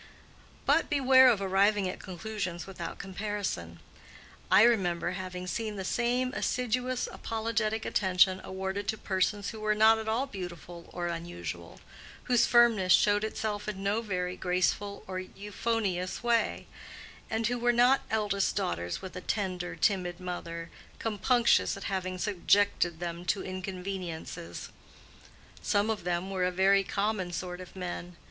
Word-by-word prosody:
But - - +3
beware 260 -3 +6
of 210 -5 +2
arriving 195 +1 +3
at 185 - -5
conclusions 190 -2 -5
without 180 -3 -6
comparison. 190 - -4 0.7
I - - +7
remember 180 -7 +2
having 185 -1 -5
seen 215 +4 -3
the 195 - -4
same 250 +4 0
assiduous, 250 -1 -1
apologetic 220 -1 -2
attention 185 -1 +3
awarded 190 +2 -4
to 220 - 0
persons 200 +1 0
who 220 - -9
were 215 0 +1
not 220 +1 +6
at 220 - -6
all 235 +5 +1
beautiful 175 - -8
or 175 -1 -4
unusual, 90 - -6 0.4
whose 245 -2 +3
firmness 230 -6 +5
showed 205 0 +4
itself 215 -1 -3
in 195 -2 -4
no 205 +3 +1
very 180 -4 -2
graceful 185 +3 0
or 185 0 -4
euphonious 200 0 -2
way, 235 -1 +1 0.6
and 225 +1 -1
who 245 +2 0
were 240 +1 +3
not 245 +3 +4
eldest 205 -3 0
daughters 85 - -2
with 190 - -7
a 185 - -5
tender, 180 -3 -2
timid 180 -4 0
mother, 170 -2 -5 0.3
compunctious 235 +3 +2
at - - -8
having 185 -2 -2
subjected 185 -2 +2
them 170 0 -4
to 190 +3 0
inconveniences. 185 -3 -5 0.9
Some 205 +1 +1
of 210 -5 -4
them 180 +2 -1
were 185 -2 -1
a 180 - +3
very 195 +2 +4
common 200 -2 -1
sort 180 +1 -5
of 185 - -12
men. 180 -1 -6
195 Hz, 140 wpm, -30 LUFS, 180-220 Hz, 0.9 s, I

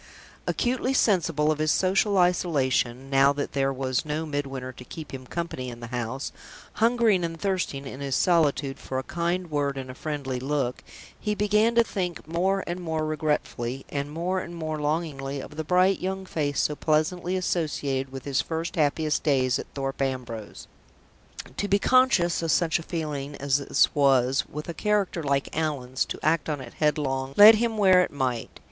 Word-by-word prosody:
Acutely 255 +2 0
sensible 165 - +2
of 155 - -2
his 155 0 +2
social 195 +2 +2
isolation, 140 -7 +1
now 135 +1 +5
that 145 0 -3
there 135 0 +1
was 130 -1 -1
no 155 +1 -3
Midwinter 135 -3 -4
to 125 - -12
keep 155 +3 -9
him 130 -1 -7
company 165 -7 -4
in 120 -1 -9
the 120 - -7
empty 125 +1 -4
house, 120 +3 -4 0.4
hungering 225 -5 +3
and 165 -1 -4
thirsting 180 -7 -2
in 135 0 -7
his 140 -2 -2
solitude 145 -5 +2
for 130 - -5
a 130 - -2
kind 175 +1 -2
word 140 -2 0
and 130 -1 -5
a - - -9
friendly 135 -2 -4
look, 135 -2 -2 0.4
he 210 -1 -1
began 210 +3 +2
to 235 - +6
think 180 -8 -4
more 190 +4 0
and 175 +1 -4
more 160 -3 -2
regretfully 150 -5 -2
and 140 0 -3
more 175 +4 -1
and 175 -1 -7
more 155 -2 -4
longingly 145 -3 -2
of 150 - -9
the 160 - -3
bright 185 +4 +3
young 190 +1 -3
face 145 -5 -1
so 150 - 0
pleasantly 170 +5 0
associated 145 -7 -1
with 135 -1 -8
his 140 -2 +1
first 165 +1 -4
happiest 150 0 +1
days 130 -4 +2
at - - -6
Thorpe 135 0 -3
Ambrose. 125 -5 -4 0.9
To 205 - -1
be 200 0 +4
conscious 205 -8 +3
of 165 - -2
such 165 0 +2
a - - -6
feeling 150 -4 -4
as 140 0 +1
this 140 - +2
was, 135 -2 +3
with 150 +1 -6
a 170 - -4
character 205 -3 0
like 140 -2 -1
Allan's, 135 -5 -1
to - - -5
act 155 0 +1
on 150 -2 -2
it 125 -3 -9
headlong, 135 -3 0
lead 210 +2 +11
him 225 0 0
where 190 -3 +6
it - - -3
might. 130 -5 -3
150 Hz, 185 wpm, -26 LUFS, 135-175 Hz, 0.9 s, lead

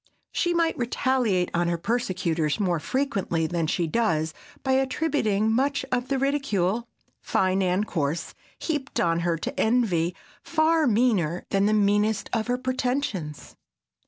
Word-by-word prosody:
She 345 0 0
might 335 -1 +2
retaliate 240 -6 +1
on 175 0 +1
her 170 0 0
persecutors 175 -6 -1
more 180 -5 +1
frequently 195 - -1
than 165 0 -1
she 170 +2 0
does 160 -5 0 0.3
by 265 - 0
attributing 260 -6 +1
much 275 +4 +1
of 250 0 0
the 275 - 0
ridicule, 240 -6 0 0.3
fine 190 +1 +1
and 185 +2 +1
coarse, 155 -3 -2 0.2
heaped 290 -4 -3
on 165 -1 +2
her, 170 -1 0
to - - -5
envy, 195 -8 +2 0.3
far 320 -1 +2
meaner 205 -8 +1
than 195 0 +3
the 215 - +2
meanest 205 +1 +2
of 225 -2 0
her 245 0 +1
pretensions. 255 - -3
215 Hz, 140 wpm, -25 LUFS, 175-260 Hz, 0.3 s, than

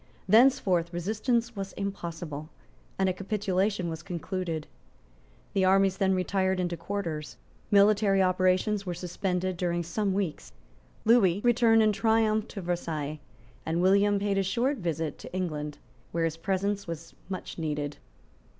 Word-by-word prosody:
Thenceforth 195 -6 +4
resistance 225 +6 -1
was 195 -1 -5
impossible; 170 -6 -5 0.5
and 190 - +2
a 185 - +1
capitulation 195 -1 -1
was 160 -1 -5
concluded. 175 -2 -4 0.9
The 195 - +2
armies 190 0 +4
then 190 -1 +2
retired 190 0 0
into 175 -1 -1
quarters. 165 -4 -4 0.3
Military 205 -1 +4
operations 185 +2 +2
were 180 -3 -4
suspended 180 +1 -2
during 175 -1 -1
some 195 +4 -1
weeks; 190 - -3 0.5
Lewis 210 -5 +4
returned 230 -2 +5
in 215 - +4
triumph 220 0 +2
to 200 - -7
Versailles; 160 -4 -3 0.4
and 165 +1 -1
William 200 +3 +4
paid 200 0 0
a - - +2
short 240 +9 0
visit 165 -4 -3
to - - -10
England, 150 -5 -3 0.4
where 165 -1 +1
his 165 0 -2
presence 195 +3 -1
was 165 0 -7 0.2
much 185 -2 -6
needed. 150 -2 -3
185 Hz, 135 wpm, -28 LUFS, 170-205 Hz, 0.9 s, returned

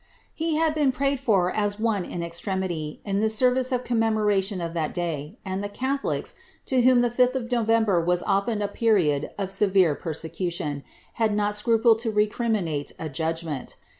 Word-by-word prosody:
He 320 -1 -1
had 320 0 +2
been 295 -3 +2
prayed 275 +1 0
fur 200 -9 +2
a« 205 -1 0
one 215 -4 0
in 175 - -5
extremitv. 170 -2 -4
in 200 -1 0
itie 220 - +2
service 255 +3 +2
of 250 -1 0
conimemordtioii 210 -5 +1
of 165 - -6
that 160 -3 -2
day. 165 - -3
and 190 +1 -3
liie 205 - -4
catholics, 275 +2 -2 0.3
to 260 -2 +2
w'hoiii 250 0 +5
ilif 240 0 -1
5ih 250 0 +4
of 260 - -1
KoTember 225 -6 +2
was 175 +1 +1
often 205 +2 0
a - - 0
period 190 -10 +1
of 195 -2 -3
severe 195 -4 +3
persecution, 160 -2 -4 0.4
had 215 -2 +2
notscu 210 +2 +1
plcd 225 -1 +5
10 225 -1 -2
recriminate 210 -8 0
a 160 - -5
judgment. 160 -1 -4
205 Hz, 170 wpm, -25 LUFS, 175-235 Hz, 0.4 s, w'hoiii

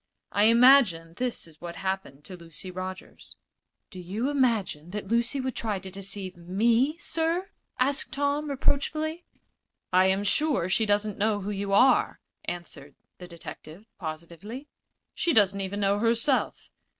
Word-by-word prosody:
I 205 +1 +3
imagine 230 -9 +5
this 250 -1 -2
is 160 -2 -18
what 170 -1 -7
happened 190 -7 -4
to 185 - -9
Lucy 170 +2 -10
Rogers." 185 +1 -8 0.6
"Do 185 - -9
you 210 +10 -2
imagine 225 - 0
that 200 0 -6
Lucy 235 +4 +1
would 260 -1 -3
try 215 -3 -2
to 190 0 -8
deceive 195 -1 -5
me, 230 - +1
sir?" 335 +4 -1 0.3
asked 275 +2 +1
Tom, 285 +2 -1
reproachfully. 310 +4 -1 0.7
"I 185 +1 +5
am 190 +1 +1
sure 275 - +1
she 220 +3 +2
doesn't 205 0 0
know 210 0 +1
who 200 +2 -4
you 200 0 -3
are," 250 +7 +4 0.3
answered 155 -5 -7 0.2
the 180 - -9
detective, 170 +2 -10
positively. 170 - -7 0.5
"She 340 - +1
doesn't 200 -3 +4
even 195 +1 -3
know 200 +1 +2
herself. 235 +4 0
205 Hz, 145 wpm, -27 LUFS, 185-255 Hz, 0.7 s, imagine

